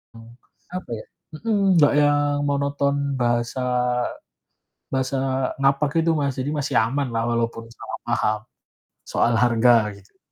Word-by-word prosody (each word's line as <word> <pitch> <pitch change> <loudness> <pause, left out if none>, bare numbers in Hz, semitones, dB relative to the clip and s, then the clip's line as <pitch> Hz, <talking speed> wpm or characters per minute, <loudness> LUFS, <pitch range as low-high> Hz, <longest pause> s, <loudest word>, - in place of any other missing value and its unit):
mmm, 115 0 -13 0.4
apa 185 -9 -6
ya - - -11 0.3
mhm, 220 -3 0 0.2
nggak 145 - +5
yang 145 0 +2
monoton 140 0 0 0.2
bahasa 120 +1 0 1.3
bahasa 130 +1 0 0.4
ngapak 140 +1 +2
itu 165 - +3
Mas 140 -3 -1
jadi 135 +3 -2
masih 145 -2 -2
aman 135 +5 0
lah 115 0 0
walaupun 115 -1 -1
salah - - -8
paham, 110 -2 +1 0.7
soal 120 - +1
harga 120 +1 +4 0.2
gitu. 100 - -23
130 Hz, 130 wpm, -23 LUFS, 115-145 Hz, 1.3 s, nggak